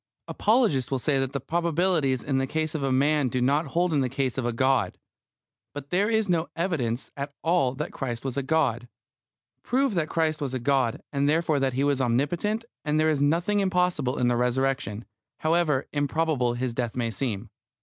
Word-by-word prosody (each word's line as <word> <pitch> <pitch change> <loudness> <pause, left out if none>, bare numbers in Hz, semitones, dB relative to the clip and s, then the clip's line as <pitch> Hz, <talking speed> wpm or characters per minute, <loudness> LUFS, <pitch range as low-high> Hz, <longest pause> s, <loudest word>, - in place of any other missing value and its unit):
Apologists 210 - +2
will 135 - 0
say 135 +2 +1
that 135 -1 -1
the 140 - -2
probabilities 165 -3 +1
in 135 -1 0
the 135 - -1
case 155 +2 -2
of 155 - -3
a 135 -1 0
man 145 +2 +3
do 125 - -1
not 140 +5 +2
hold 175 +4 0
in 145 - +2
the 130 - 0
case 130 -1 -1
of 120 - -1
a - - 0
God. 125 -4 +1 0.8
But 145 0 -7
there 195 +4 +2
is 220 -2 +1
no 170 -2 +1
evidence 145 -9 -2
at 140 0 -5
all 160 -6 +2
that 150 +3 -4
Christ 120 -2 -5
was 130 -2 -3
God. 135 -4 0 0.7
Prove 265 0 +1
that 165 -4 -1
Christ 160 -2 0
was 135 -2 -2
God, 130 -2 0
and 140 +1 +1
therefore 155 -1 +2
that 135 -1 0
He 135 +2 0
was 140 -2 +1
omnipotent, 165 - 0 0.2
and 150 0 +1
there 155 0 +3
is 145 -2 0
nothing 170 +8 +2
impossible 180 -8 +1
in 125 - +2
the 120 - +2
Resurrection, 125 -2 -1 0.4
however 155 -4 +2
improbable 145 -4 0
His 125 0 -2
death 120 -2 -3
may 120 -2 -1
seem. 110 -1 -3
140 Hz, 190 wpm, -26 LUFS, 130-165 Hz, 0.8 s, man